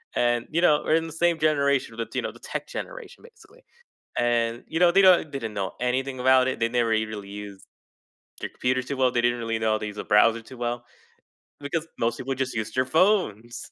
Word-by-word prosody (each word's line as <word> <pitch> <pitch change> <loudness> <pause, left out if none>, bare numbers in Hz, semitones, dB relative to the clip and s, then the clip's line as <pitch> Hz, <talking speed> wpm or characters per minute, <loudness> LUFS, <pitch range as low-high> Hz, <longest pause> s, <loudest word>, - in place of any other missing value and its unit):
and, 120 -1 +1
you 165 +2 +1
know, 150 -4 +4
we're 155 - +2
in 165 0 +1
the 160 - -9
same 170 0 +2
generation, 140 -6 +1
th 115 - -3
you - - +1
know, - - -3
the - - -17
tech - - -5
generation - - -8
basically, 460 +1 -19 0.6
and, 120 -1 0
you 165 - -2
know, 175 -1 +6
they 195 +2 +5
don't 180 -5 +5
they 140 - -3
didn't 110 -4 -6
know 95 -2 -3
anything 130 +1 -1
about 130 0 +5
it, - - -2
they 115 - +2
never 120 -1 +1
eve 110 0 +1
really 105 -2 -7
use 100 -1 -9 0.8
their - - -4
computers 125 0 -1
too 140 - -3
well, 130 -1 +3
they 120 - +1
didn't 120 0 +1
really 115 -1 -2
know 110 0 +1
how - - +1
to - - -4
use 105 - -8
a - - -4
browser 110 +2 +4
too 125 +3 -13
well, 120 0 -3 0.8
because 155 +3 -3
most 115 0 0
people 135 +1 -3
just 130 0 -3
used 110 -1 -4
their 130 - +3
phones. 130 - +1
125 Hz, 230 wpm, -25 LUFS, 115-155 Hz, 0.8 s, know